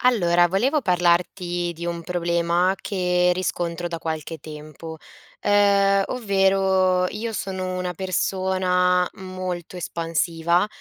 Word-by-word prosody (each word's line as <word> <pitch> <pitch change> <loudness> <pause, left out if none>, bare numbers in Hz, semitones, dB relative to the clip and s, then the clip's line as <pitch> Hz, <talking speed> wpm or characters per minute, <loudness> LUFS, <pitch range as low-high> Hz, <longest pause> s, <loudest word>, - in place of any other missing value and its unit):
Allora, 175 -8 +4
volevo 255 - +1
parlarti 175 -1 +1
di 170 +1 -6
un 170 -1 -3
problema 170 +1 +1
che 180 -3 +1
riscontro 175 -1 -2
da 170 - -4
qualche 160 0 -4
tempo, 155 +1 -10 0.4
uhm, 200 -1 +4
ovvero, 190 -4 +2
io 225 +3 -4
sono 185 -3 -3
una 180 -1 -3
persona 185 0 +1
molto 185 -2 -6
espansiva, 170 +1 0
180 Hz, 105 wpm, -23 LUFS, 170-190 Hz, 0.4 s, Allora